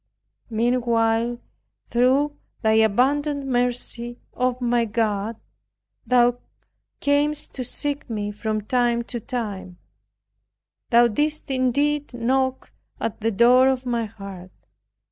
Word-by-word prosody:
Meanwhile, 235 0 +1 0.5
through 265 +5 +2 0.3
thy 220 - +3
abundant 275 +7 +2
mercy, 245 -1 -1 0.2
O 250 0 0
my 240 -1 +1
God, 220 -1 -1 0.7
Thou 245 -1 +4 0.6
camest 295 +1 +1
to 255 - -4
seek 285 +3 -2
me 210 -2 -3
from 215 +1 -3
time 240 +1 +1
to 240 0 -5
time, 210 -7 -5 1.1
Thou 240 0 +6
didst 295 +5 -1
indeed 280 +2 0
knock 260 +2 0 0.3
at 225 - -4
the 225 - +1
door 245 +4 +5
of 260 -1 0
my 235 -2 -1
heart. 195 -3 -10
240 Hz, 105 wpm, -23 LUFS, 225-260 Hz, 1.1 s, Thou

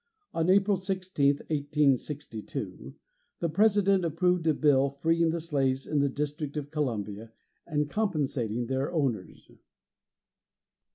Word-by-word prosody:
On 165 +1 0
April 200 +1 +4
16, 185 -5 0 0.2
1862, 140 - -1 0.4
the 170 - 0
President 200 +1 +3
approved 175 +1 +1
a 160 - +5
bill 140 -2 +3
freeing 165 +4 +1
the 170 +1 -1
slaves 135 -5 0
in 150 - 0
the 140 0 +2
District 150 +1 -3
of 145 -1 -5
Columbia 110 -7 -3 0.4
and 150 -1 0
compensating 140 - -1
their 135 +4 -1
owners. 135 - -3
150 Hz, 115 wpm, -28 LUFS, 135-170 Hz, 0.4 s, a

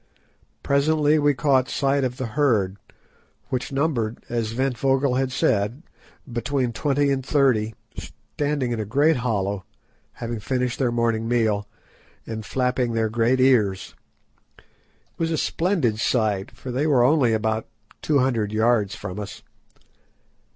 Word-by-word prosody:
Presently 150 +2 +2
we 145 -1 +3
caught 130 0 +2
sight 140 0 +1
of 125 -1 -2
the 130 - -3
herd, 105 -9 +1 0.7
which 130 +2 -3
numbered, 135 -6 -1
as 115 -2 -2
Ventvögel 135 0 +1
had 135 -1 -1
said, 120 - 0 0.5
between 125 +1 -1
twenty 145 +2 +1
and 135 -1 -1
thirty, 125 -6 +2 0.2
standing 145 -4 -3
in 115 - -2
a 140 +10 +2
hollow, 100 -7 -1 0.5
having 120 -1 -5
finished 125 +3 -2
their 125 -3 +1
morning 115 -1 0
meal, 110 -4 +1 0.6
and 110 -1 -5
flapping 125 0 0
their 110 -1 +1
great 120 +3 +1
ears. 110 -8 +2 0.6
It - - -21 0.6
was 165 -1 0
a 160 - 0
splendid 160 - 0
sight, 110 -3 0
for 130 - -8
they 135 +5 0
were 135 -5 +4
only 130 -3 +3
about 110 0 -1 0.3
two 150 - +2
hundred 120 -6 +1
yards 110 -2 +2
from 100 0 -6
us. 105 0 -8
125 Hz, 135 wpm, -23 LUFS, 110-140 Hz, 0.7 s, were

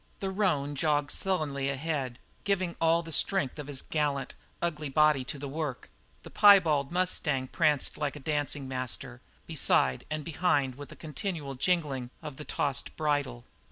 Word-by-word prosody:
The 195 -1 -2
roan 165 -8 +1
jogged 145 0 +1
sullenly 150 -8 0
ahead, 140 -3 -2 0.3
giving 185 -3 0
all 165 +1 +4
the 165 - -8
strength 160 -3 +1
of 145 - -6
his 140 -3 -3
gallant, 145 -3 -1 0.3
ugly 155 -4 -2
body 150 -1 +4
to 140 - -5
the 140 +1 -5
work; 145 -2 -4 0.3
the - - -11
piebald 165 -9 +6
mustang 160 -7 +1
pranced 150 -5 +1
like 145 -1 -1
a - - -7
dancing 145 -1 -2
master 130 - -4 0.2
beside 65 -1 +2
and 155 0 -3
behind 145 -5 +1
with 145 +2 -10
a - - -9
continual 155 -2 -5
jingling 140 -4 0
of 150 -3 -7
the 150 - -7
tossed 140 -3 -2
bridle. 145 -6 -1
150 Hz, 155 wpm, -29 LUFS, 135-165 Hz, 0.3 s, piebald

